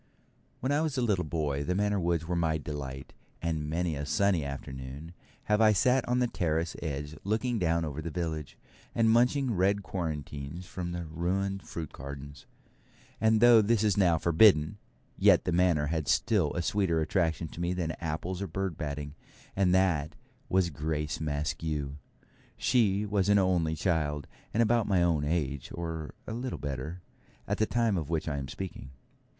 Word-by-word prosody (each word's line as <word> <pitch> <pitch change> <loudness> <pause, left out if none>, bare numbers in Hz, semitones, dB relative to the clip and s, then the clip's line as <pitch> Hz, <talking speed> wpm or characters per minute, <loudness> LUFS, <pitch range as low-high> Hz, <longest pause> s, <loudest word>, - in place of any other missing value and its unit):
When 130 - 0
I 145 +2 +2
was 155 -4 -1
a - - +2
little 100 -6 +1
boy 75 -3 -1
the 90 +5 -1
Manor 105 0 +1
woods 85 -2 0
were 90 - -1
my 80 -2 +1
delight, 70 -3 -6 0.3
and 80 -3 -2
many 85 0 -1
a 70 - -4
sunny 90 +3 +2
afternoon 70 +3 -7 0.3
have 105 +1 +2
I 110 -1 +6
sat 125 +7 +3
on 125 0 +1
the 125 - +3
terrace 80 -6 -1
edge 75 -1 -4
looking 110 +3 0
down 85 -2 +1
over 75 0 -4
the 85 - -4
village, 80 -4 -4 0.4
and 115 -1 +4
munching 125 +2 +3
red 100 +2 +2
quarantines 75 -2 -5
from 90 -1 -5
the 85 -1 -4
ruined 95 +5 -2
fruit 80 -3 -6
gardens. 70 +1 -9 0.7
And 110 0 +3
though 120 -2 +8
this 110 0 +2
was 105 -3 +3
now 90 -5 +4
forbidden, 85 +2 +4 0.4
yet - - +5
the - - +1
Manor 85 -3 +3
had 80 -4 -2
still 95 - +2
a 85 - -1
sweeter 95 -4 +1
attraction 80 0 0
to 85 - -8
me 85 0 0
than 90 -3 -1
apples 85 +3 -3
or 100 - -2
bird 95 -1 -3
batting, 75 -2 -4 0.4
and 95 -2 +3
that 85 -6 +2 0.3
was 95 -2 +2
Grace 75 0 -2
Maskew. 75 -1 -2 0.6
She 105 -5 +2
was 100 -2 +1
an 100 - +6
only 90 -5 +2
child, 75 -4 0 0.3
and 115 +3 +3
about 115 -1 +2
my 95 -4 +3
own 80 -4 +2
age, 75 -4 -1
or 80 -2 -5
little 120 +3 -4
better, 75 +5 -5 0.4
at - - -1
the 110 - +3
time 115 -4 +1
of 80 -3 -3
which 80 -1 -1
I 75 -2 -1
am 70 - -5
speaking. 90 -2 -7
85 Hz, 175 wpm, -29 LUFS, 75-100 Hz, 0.7 s, though